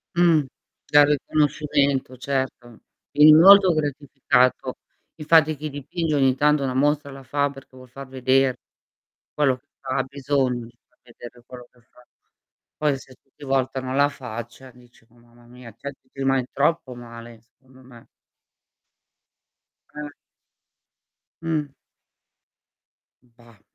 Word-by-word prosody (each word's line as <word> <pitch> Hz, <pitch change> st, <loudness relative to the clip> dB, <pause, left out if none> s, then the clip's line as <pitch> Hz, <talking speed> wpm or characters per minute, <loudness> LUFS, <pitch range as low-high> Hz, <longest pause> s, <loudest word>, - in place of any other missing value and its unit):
Mh. 170 Hz, -4 st, +4 dB, 0.5 s
Dal 145 Hz, 0 st, +6 dB
riconoscimento, 145 Hz, -2 st, 0 dB
certo. 130 Hz, -3 st, -4 dB, 0.3 s
In 150 Hz, +1 st, +7 dB
un 160 Hz, -, +7 dB
volto 195 Hz, -1 st, +8 dB
gratificato. 135 Hz, -3 st, 0 dB, 0.4 s
Infatti, 155 Hz, 0 st, +3 dB
chi 155 Hz, +2 st, -6 dB
dipinge 150 Hz, +3 st, -3 dB
ogni 135 Hz, -2 st, +2 dB
tanto 150 Hz, 0 st, +2 dB
una 130 Hz, -1 st, -2 dB
mostra 145 Hz, +1 st, 0 dB
la 135 Hz, 0 st, -11 dB
fa 140 Hz, +2 st, -1 dB
perché 135 Hz, -1 st, -15 dB
vuol 130 Hz, 0 st, -14 dB
far 135 Hz, +1 st, -10 dB
veder 130 Hz, 0 st, +1 dB, 0.8 s
quello 135 Hz, -4 st, +1 dB
che 140 Hz, +3 st, -35 dB
ha 135 Hz, -, -2 dB
bisogno 130 Hz, -3 st, -2 dB
di 120 Hz, 0 st, -18 dB
far 125 Hz, -, -41 dB
vedere 120 Hz, 0 st, -14 dB
quello 125 Hz, -1 st, -12 dB
che 125 Hz, -, -27 dB
fa. 125 Hz, +1 st, -24 dB, 0.7 s
Poi, 145 Hz, -3 st, 0 dB
se 130 Hz, -1 st, -16 dB
tutti 135 Hz, +2 st, -18 dB
voltano 130 Hz, -1 st, -2 dB
la 145 Hz, +1 st, +3 dB
faccia, 125 Hz, 0 st, -9 dB
dici: 120 Hz, -2 st, -22 dB
"Mò, 120 Hz, +1 st, -26 dB
mamma 120 Hz, 0 st, -22 dB
mia". 125 Hz, -2 st, -13 dB
Cioè, 140 Hz, +4 st, -7 dB
ci 130 Hz, -, -37 dB
rimani 135 Hz, -2 st, 0 dB
troppo 140 Hz, -3 st, 0 dB
male 115 Hz, -1 st, -11 dB
i 110 Hz, -, -20 dB
secondo 130 Hz, +3 st, -23 dB
me. 120 Hz, -2 st, -17 dB, 1.9 s
Eh. 150 Hz, -1 st, -7 dB, 1.3 s
Mh. 155 Hz, -4 st, -2 dB, 1.5 s
Bah. 115 Hz, -3 st, -23 dB
135 Hz, 130 wpm, -23 LUFS, 125-145 Hz, 1.9 s, volto